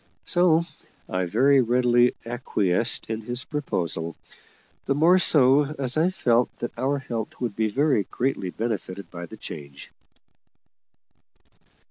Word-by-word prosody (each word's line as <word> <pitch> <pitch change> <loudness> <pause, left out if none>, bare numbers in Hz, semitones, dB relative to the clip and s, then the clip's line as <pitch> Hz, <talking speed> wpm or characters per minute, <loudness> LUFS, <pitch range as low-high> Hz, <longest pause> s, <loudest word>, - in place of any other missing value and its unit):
So 175 -3 +3 0.5
I 95 0 -1
very 130 +9 +4
readily 120 0 +3
acquiesced 115 -3 -1
in 110 0 -3
his 120 +3 -3
proposal, 85 - -3 0.7
the 140 - +1
more 170 +5 +5
so 145 -2 +4
as 130 -2 -2
I 160 +3 +3
felt 125 -9 +2
that 120 - -5
our 135 +4 0
health 115 -5 -5
would 120 -5 -3
be 110 0 +1
very 135 -3 +1
greatly 125 -6 -2
benefited 100 -4 -4
by 85 -1 -7
the - - -11
change. 70 -2 -9
120 Hz, 125 wpm, -25 LUFS, 105-140 Hz, 0.7 s, more